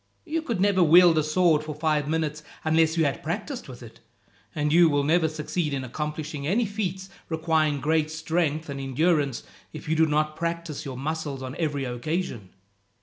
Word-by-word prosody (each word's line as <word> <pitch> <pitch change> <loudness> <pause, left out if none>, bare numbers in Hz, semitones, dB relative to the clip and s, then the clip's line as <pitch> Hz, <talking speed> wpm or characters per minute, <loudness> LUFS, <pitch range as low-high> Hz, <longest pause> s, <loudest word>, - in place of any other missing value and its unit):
You 325 0 -1
could 235 - -3
never 195 -1 +3
wield 170 0 +7
a - - +1
sword 155 0 +3
for 155 -1 -6
five 150 -2 0
minutes 155 -1 -1 0.2
unless 160 +1 +2
you 160 - +3
had 140 - -1
practised - - -4
with - - -10
it; - - -13 0.6
and 150 0 0
you 170 0 +6
will 145 -1 +1
never 160 +3 +3
succeed 155 0 -2
in 135 - -3
accomplishing 150 +2 -4
any 220 +8 +2
feats 190 -2 -3 0.2
requiring 160 -3 +1
great 155 +1 +1
strength 160 -1 -1
and 140 -1 -5
endurance, 140 -1 +1 0.3
if - - -9
you 160 - +1
do 160 0 +4
not 155 0 0
practise 170 -3 -4
your 130 -2 -6
muscles 145 -1 -4
on 130 +1 -6
every 145 -4 -1
occasion. 125 - -3
155 Hz, 180 wpm, -26 LUFS, 145-170 Hz, 0.6 s, wield